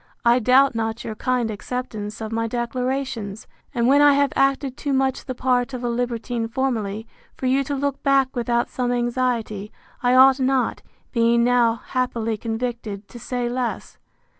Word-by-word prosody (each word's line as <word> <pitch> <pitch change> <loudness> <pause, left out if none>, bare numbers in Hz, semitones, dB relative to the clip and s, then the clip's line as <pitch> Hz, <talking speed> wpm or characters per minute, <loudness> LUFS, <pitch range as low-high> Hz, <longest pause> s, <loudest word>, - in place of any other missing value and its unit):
I 240 +1 +5
doubt 255 +3 +5
not 225 0 -2
your 220 - -4
kind 245 0 -1
acceptance 215 -1 -5
of 220 0 -4
my 230 0 -1
declarations. 240 -3 -3 0.3
And 235 -1 0
when 280 +3 +5
I 290 -1 +7
have 280 0 +2
acted 275 -1 +1
too 285 +1 -2
much 265 -1 0
the 255 - -4
part 250 +1 0
of 250 - -6
a 240 - 0
libertine 235 -1 -2
formerly, 225 -4 -2 0.3
for - - -6
you 265 +2 +3
to 285 - -2
look 280 0 -2
back 275 -1 +2
without 240 0 0
some 245 -1 -2
anxiety, 240 -4 -1 0.3
I 250 0 +3
ought 265 +1 +7
not, 260 -1 +1 0.3
being 235 -1 +3
now 240 -1 +3
happily 235 -3 -1
convicted, 225 -2 -4
to 240 - -10
say 245 +1 -2
less. 245 0 -3
245 Hz, 165 wpm, -22 LUFS, 230-260 Hz, 0.3 s, I